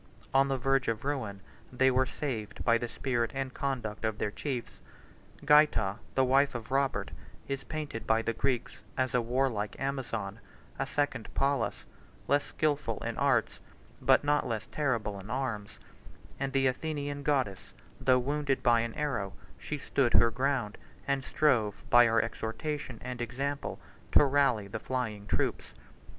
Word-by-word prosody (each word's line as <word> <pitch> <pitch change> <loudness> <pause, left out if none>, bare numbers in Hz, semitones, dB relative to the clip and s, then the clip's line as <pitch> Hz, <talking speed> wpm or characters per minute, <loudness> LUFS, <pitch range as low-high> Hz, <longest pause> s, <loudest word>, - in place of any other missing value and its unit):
On 135 +1 +5
the 135 -1 0
verge 135 +1 +1
of 115 +2 -1
ruin, 110 -9 -2 0.3
they 130 +1 +4
were 130 +1 +2
saved 110 -10 -4
by 115 0 +4
the 120 - -2
spirit 120 0 -1
and 135 -1 -3
conduct 120 -7 -3
of 110 -1 0
their 105 - -1
chiefs. 125 +2 -5 0.6
Gaita, 150 -10 +4 0.2
the 130 - +4
wife 135 +1 +3
of 115 +1 -6
Robert, 135 0 +1 0.4
is 135 0 -3
painted 150 -8 -5
by 110 0 +3
the 115 - 0
Greeks 125 +1 -1 0.2
as 130 -2 0
a 125 - +3
warlike 120 -3 -1
Amazon, 115 -7 -3 0.4
a 135 - 0
second 145 -6 -1
Pallas; 140 0 0 0.4
less 145 0 +3
skilful 145 -7 -1
in 115 0 -2
arts, 135 -5 +2 0.4
but - - +5
not 145 -1 +2
less 110 -2 -2
terrible 115 -9 -1
in 95 +2 -10
arms, 115 -5 -3 0.6
than 135 0 -1
the 135 0 +1
Athenian 145 +1 -1
goddess: 130 - +1 0.4
73 - - -12
though 130 -1 +6
wounded 140 +1 -1
by 120 -2 +5
an 115 0 -2
arrow, 130 -10 -2 0.3
she 150 - -4
stood 135 -3 +1
her 115 0 +6
ground, 130 -4 -1 0.3
and 140 -1 +1
strove, 120 -9 +1
by 120 -1 +8
her 115 0 +3
exhortation 120 +4 -4
and 125 -1 -5
example, 135 +4 -3 0.3
to - - +8
rally 135 -7 +2
the 105 +2 -5
flying 110 -5 -3
troops. - - -1
130 Hz, 160 wpm, -30 LUFS, 115-140 Hz, 0.6 s, by